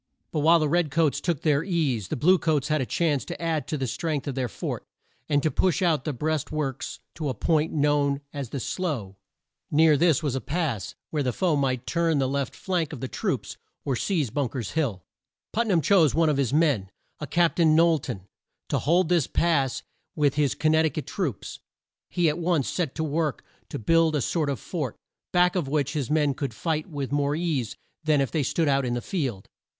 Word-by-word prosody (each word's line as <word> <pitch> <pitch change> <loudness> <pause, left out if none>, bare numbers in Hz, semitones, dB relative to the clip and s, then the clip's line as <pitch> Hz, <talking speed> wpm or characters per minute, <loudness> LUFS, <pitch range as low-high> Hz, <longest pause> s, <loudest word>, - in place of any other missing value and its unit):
But 155 - -1
while 165 +3 +6
the 155 -2 +1
red 170 +1 +2
coats 155 0 +1
took 170 -5 -1
their 150 -1 +3
ease, 150 - 0
the - - -2
blue 180 +8 +4
coats 155 -3 0
had 155 -2 +2
a 130 - -2
chance 155 -5 +1
to - - -6
add 165 -2 -1
to 155 - -2
the 135 - -2
strength 150 +4 -2
of 140 - -2
their 130 -1 -1
fort, - - -5 0.5
and 145 -1 +2
to 155 - +2
push 185 0 +1
out 160 -7 +2
the 150 - 0
breast 150 +3 -2
works 140 -4 -3
to 155 -3 -3
a 130 - -2
point 160 -1 +1
known 145 -1 +1
as 140 -4 -5
the 140 - -4
Slough. 130 - -3 0.6
Near 155 0 +5
this 165 0 +3
was 145 -4 0
a 135 - -2
pass 145 - -2 0.2
where 150 - 0
the 130 -2 0
foe 175 +3 +1
might 130 -3 0
turn 165 -2 +1
the 135 -1 +2
left 140 -1 -2
flank 175 -5 -2
of 140 - -6
the 130 - -3
troops - - -3 0.3
or 135 - 0
seize 150 - 0
Bunk 140 -1 -2
er's 120 -6 -3
Hill. 125 - -1 0.5
Put 230 +2 +1
nam 180 -6 +3
chose 165 -5 +4
one 165 -1 +3
of 150 - +1
his 135 -3 +1
men, 140 - +2 0.3
a 150 - -5
Cap 170 +4 +2
tain 160 -3 +5
Knowl 165 -1 +5
ton, 125 -7 -6 0.5
to - - +1
hold 175 +3 +2
this 170 -5 +2
pass 140 -7 +1 0.3
with 145 -3 +2
his 145 -3 +1
Con 155 - +2
nect 160 0 +4
i - - 0
cut 155 - -5
troops. 150 - -4 0.5
He 175 -2 +1
at 155 +2 0
once 170 -5 +1
set 165 -7 -2
to 160 - -1
work 155 -2 -1 0.3
to - - -4
build 165 +6 +3
a 145 - +1
sort 155 +3 0
of 140 - -2
fort, 150 - -4 0.4
back 180 0 +3
of 175 -7 0
which 145 0 0
his 145 -6 -2
men 150 -2 +2
could 135 -4 -4
fight 155 +5 -2
with 140 -4 -4
more 145 0 +1
ease 155 -8 -2 0.3
than 155 -2 +3
if 135 - 0
they 160 - +1
stood 155 +4 0
out 140 -1 +2
in 120 -1 -1
the - - -1
field. 130 - -3
150 Hz, 220 wpm, -26 LUFS, 135-165 Hz, 0.6 s, while